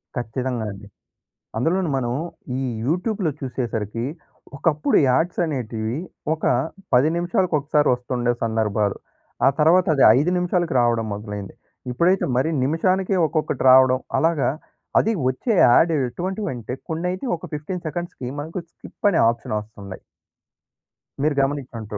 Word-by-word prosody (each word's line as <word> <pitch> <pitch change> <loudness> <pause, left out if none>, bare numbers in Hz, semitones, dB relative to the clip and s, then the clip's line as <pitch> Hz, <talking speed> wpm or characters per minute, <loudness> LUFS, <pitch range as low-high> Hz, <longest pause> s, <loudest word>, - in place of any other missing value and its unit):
ఖచ్చితంగా 120 0 -3
అండి. 100 +1 -11 0.7
అందులోన 170 +8 +1
మనం 120 -2 -1 0.5
ఈ - - -2 0.2
యూట్యూబ్‌లో 185 - 0
చూసేసరికి 115 -4 -3 0.5
ఒకప్పుడు 150 0 +2
యాడ్స్ 165 +8 +1
అనేటివి 115 -5 -3 0.4
ఒక 160 - -8 0.5
10 130 +5 +5
నిమిషాలకు 175 0 0
ఒకసారి 150 +1 +1
వస్తుండే 125 0 -1
సందర్భాలు. 110 -3 0 0.5
ఆ! - - +6
తర్వాత 175 +4 +5
అది 135 - +4
5 150 +6 +2
నిమిషాలకు 175 -3 0
రావడం 120 -1 +1
మొదలైంది. 105 -1 -7 0.4
ఇప్పుడైతే 175 +9 +2
మరి 145 +5 +2
నిమిషానికే 185 +7 +1
ఒక్కొక్కటి 155 0 -2
రావడం, 130 0 +6 0.2
అలాగా 165 -3 +2 0.5
అది 225 - +2 0.2
వచ్చే 130 - -1
యాడ్ 165 +8 +5 0.2
ఎటువంటివంటే 170 - -4 0.2
కొన్నైతే 180 +6 -2
ఒక - - -9
15 170 +4 -5
సెకండ్స్‌కి 175 -5 -5
మనకు 160 +5 -5
స్కిప్ 205 - -4
అనే 170 - +2
ఆప్షన్ 115 -2 -3
వస్తున్నాయి. 100 -3 -10 1.2
మీరు 150 -2 +2
గమనిచంట్టు. 120 -7 -4
135 Hz, 120 wpm, -22 LUFS, 120-170 Hz, 1.2 s, ఆ